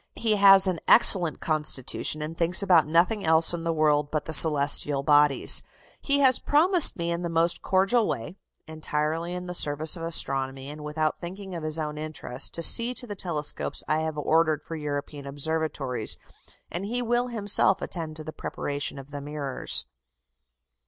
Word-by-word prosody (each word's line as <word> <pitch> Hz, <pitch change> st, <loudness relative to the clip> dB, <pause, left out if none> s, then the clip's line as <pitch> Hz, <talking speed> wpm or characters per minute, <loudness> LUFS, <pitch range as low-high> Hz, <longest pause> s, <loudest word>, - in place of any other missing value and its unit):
He 220 Hz, -2 st, -1 dB
has 195 Hz, -1 st, +6 dB
an 185 Hz, -3 st, -1 dB
excellent 175 Hz, -8 st, +4 dB
constitution, 150 Hz, -1 st, -3 dB
and 155 Hz, +2 st, -7 dB
thinks 170 Hz, +3 st, +1 dB
about 175 Hz, -6 st, +3 dB
nothing 175 Hz, +7 st, 0 dB
else 160 Hz, +1 st, +4 dB
in 170 Hz, -1 st, -6 dB
the 165 Hz, -, -2 dB
world 150 Hz, -2 st, 0 dB
but 155 Hz, -1 st, -4 dB
the 160 Hz, -, -7 dB
celestial 145 Hz, -2 st, +4 dB
bodies. 145 Hz, -1 st, +2 dB, 0.4 s
He 280 Hz, 0 st, -1 dB
has 260 Hz, -2 st, +4 dB
promised 335 Hz, +3 st, +5 dB
me 170 Hz, -1 st, -4 dB
in 170 Hz, 0 st, -4 dB
the 170 Hz, -, -5 dB
most 165 Hz, +1 st, 0 dB
cordial 195 Hz, +5 st, 0 dB
way, 115 Hz, +10 st, -6 dB, 0.3 s
entirely 155 Hz, +2 st, -4 dB
in 180 Hz, 0 st, -7 dB
the 180 Hz, -, -7 dB
service 155 Hz, -1 st, +2 dB
of 170 Hz, -, -10 dB
astronomy, 135 Hz, -4 st, +1 dB
and 150 Hz, 0 st, -11 dB
without 155 Hz, +1 st, -3 dB
thinking 190 Hz, +2 st, -9 dB
of 170 Hz, -, -6 dB
his 155 Hz, 0 st, -3 dB
own 150 Hz, -1 st, -5 dB
interest, 155 Hz, -4 st, -3 dB
to 170 Hz, -, -3 dB
see 235 Hz, +8 st, +5 dB
to 245 Hz, -, -6 dB
the 210 Hz, -, -7 dB
telescopes 160 Hz, -6 st, -4 dB
I 155 Hz, -, -1 dB
have 160 Hz, -1 st, -5 dB
ordered 155 Hz, 0 st, 0 dB
for 165 Hz, -, -9 dB
European 145 Hz, -1 st, -7 dB
observatories, 140 Hz, -5 st, -2 dB, 0.5 s
and 175 Hz, -, -5 dB
he 240 Hz, +4 st, -3 dB
will 240 Hz, +1 st, -1 dB
himself 205 Hz, -4 st, +1 dB
attend 160 Hz, -3 st, -6 dB
to 155 Hz, -, -8 dB
the 155 Hz, 0 st, -9 dB
preparation 145 Hz, 0 st, -5 dB
of 135 Hz, +1 st, -12 dB
the 145 Hz, 0 st, -7 dB
mirrors." 145 Hz, -, 0 dB
160 Hz, 175 wpm, -24 LUFS, 150-180 Hz, 0.5 s, has